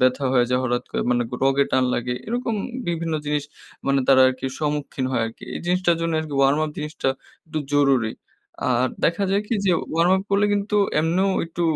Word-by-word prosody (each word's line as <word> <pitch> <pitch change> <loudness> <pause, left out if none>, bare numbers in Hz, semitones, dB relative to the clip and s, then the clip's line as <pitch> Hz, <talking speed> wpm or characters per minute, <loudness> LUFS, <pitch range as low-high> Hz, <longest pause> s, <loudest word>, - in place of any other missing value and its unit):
ব্যথা 130 +2 +2
হয়ে 125 -2 +4
যায়। 125 0 +2
হঠাৎ 120 0 -1
করে - - -1
মানে 120 0 +2
ক - - -22
রগে 135 +1 +3
টান 130 -1 +3
লাগে 125 +1 -2
এরকম 235 +1 -2 0.3
বিভিন্ন 165 -1 -1
জিনিস 150 -1 0 0.4
মানে 135 0 +3
তারা 135 -1 +7
আর - - 0
কি 130 - -4
সম্মুখীন 145 -3 -2
হয় 120 - +1
আরকি। 115 - -10
এই - - -4
জিনিসটার 180 -1 +2
জন্য 165 0 -1
আর - - -5
কি 145 - -5
ওয়ার্ম 135 +2 +4
আপ 155 - -4
জিনিসটা 150 -2 -2 0.4
একটু 155 0 -3 0.2
জরুরি। 135 -6 +3 0.5
আর 125 0 +2 0.2
দেখা 170 +4 +2
যায় 200 +1 +2
কি - - +1
যে 190 - +3 0.2
ওয়ার্ম 165 +2 +3
আপ 190 - -2
করলে 200 +1 +3
কিন্তু 205 +1 0 0.2
এমনেও 180 +5 +1
একটু 170 +1 -4
150 Hz, 210 wpm, -23 LUFS, 130-175 Hz, 0.5 s, তারা